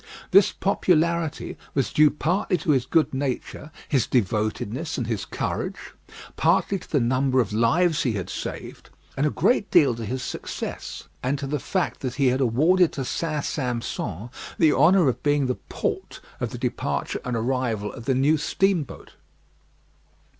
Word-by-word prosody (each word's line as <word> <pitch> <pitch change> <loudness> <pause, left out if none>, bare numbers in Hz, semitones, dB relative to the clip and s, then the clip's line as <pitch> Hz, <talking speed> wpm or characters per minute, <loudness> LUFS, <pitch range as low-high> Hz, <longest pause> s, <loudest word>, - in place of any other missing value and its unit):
This 195 -1 +6
popularity 170 -4 0 0.2
was 135 -3 0
due 150 0 +6
partly 180 +6 0
to 160 0 0
his 130 -3 +1
good 155 -1 +2
nature, 135 +2 -3 0.2
his 135 -6 +1
devotedness, 110 - -1
and 125 - -1
his 110 -4 -2
courage; - - -3 0.6
partly 195 - +2
to - - -15
the 145 - +2
number 130 +2 +2
of 105 -4 0
lives 155 +10 +3
he 125 - 0
had 95 -4 -3
saved; - - -7 0.3
and 145 +2 +1
a - - +2
great 215 - +1
deal 150 -8 +5
to 115 0 -6
his 125 +3 -3
success, - - -5 0.2
and 130 +3 0
to 140 - -4
the 145 +2 -2
fact 185 +7 -2
that 130 -2 -4
he 140 -3 +3
had 130 +2 0
awarded 160 +9 +3
to 135 - -3
St. 155 +2 -2
Sampson 120 - -3 0.3
the 155 -3 +4
honour 170 +3 +5
of 125 -1 0
being 145 -1 +2
the 125 -1 -2
port - - -3 0.2
of - - -2
the - - -7
departure - - -2
and 125 -2 -2
arrival 115 -3 -1
of 115 -3 -10
the 135 - +1
new 145 +5 +3
steamboat. 175 +1 -1
135 Hz, 165 wpm, -24 LUFS, 125-160 Hz, 0.6 s, This